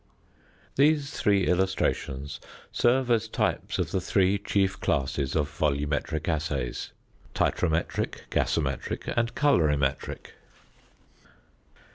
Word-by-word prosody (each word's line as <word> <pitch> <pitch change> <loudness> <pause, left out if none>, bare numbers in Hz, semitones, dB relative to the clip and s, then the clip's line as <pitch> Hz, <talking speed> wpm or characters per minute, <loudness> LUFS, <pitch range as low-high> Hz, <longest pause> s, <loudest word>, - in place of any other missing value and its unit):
These 145 0 +3
three 100 -7 +2
illustrations 75 -6 0 0.3
serve 125 +1 +2
as 115 -1 +2
types - - -1
of - - -1
the 95 - 0
three 95 +2 +2
chief 95 -1 0
classes 70 -5 -1
of 75 -2 +2
volumetric 75 0 -1
assays 75 -6 -2 0.5
titrometric, 80 -2 0
gasometric, - - -1
and 115 0 0
colorimetric. 75 - +1
90 Hz, 90 wpm, -27 LUFS, 75-105 Hz, 0.5 s, These